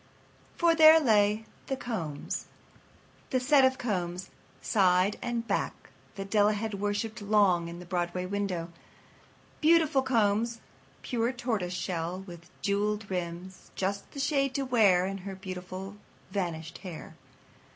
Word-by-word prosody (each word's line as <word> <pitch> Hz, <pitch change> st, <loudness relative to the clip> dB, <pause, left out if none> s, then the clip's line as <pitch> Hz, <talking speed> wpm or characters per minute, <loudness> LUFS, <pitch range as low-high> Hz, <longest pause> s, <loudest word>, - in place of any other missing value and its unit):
For 340 Hz, -1 st, +4 dB
there 320 Hz, 0 st, +8 dB
lay 215 Hz, -5 st, +3 dB, 0.2 s
The 270 Hz, -, -2 dB
Combs—the 220 Hz, -, -6 dB
set 275 Hz, +2 st, +4 dB
of 260 Hz, 0 st, +3 dB
combs, 180 Hz, -5 st, -3 dB, 0.3 s
side 185 Hz, 0 st, +2 dB
and 235 Hz, -1 st, -3 dB
back, -, -, -3 dB, 0.2 s
that 195 Hz, 0 st, -7 dB
Della 210 Hz, 0 st, +4 dB
had 210 Hz, -1 st, -4 dB
worshipped 205 Hz, +2 st, -2 dB
long 200 Hz, -5 st, +3 dB
in 170 Hz, +1 st, -8 dB
a 180 Hz, -, -10 dB
Broadway 175 Hz, 0 st, -2 dB
window. 185 Hz, -3 st, -3 dB, 0.9 s
Beautiful 315 Hz, -3 st, +4 dB
combs, 230 Hz, -2 st, +1 dB, 0.4 s
pure 235 Hz, -1 st, 0 dB
tortoise 220 Hz, -8 st, -2 dB
shell, 175 Hz, 0 st, -3 dB
with 175 Hz, -2 st, -12 dB
jewelled 205 Hz, 0 st, 0 dB
rims—just 185 Hz, +2 st, -4 dB
the 280 Hz, -, -8 dB
shade 275 Hz, -2 st, +1 dB
to 275 Hz, -, 0 dB
wear 205 Hz, -8 st, +4 dB
in 195 Hz, -1 st, -5 dB
the 195 Hz, 0 st, -6 dB
beautiful 185 Hz, +1 st, -7 dB, 0.3 s
vanished 170 Hz, -4 st, -3 dB
hair. 180 Hz, -5 st, -9 dB
200 Hz, 125 wpm, -29 LUFS, 180-235 Hz, 0.9 s, there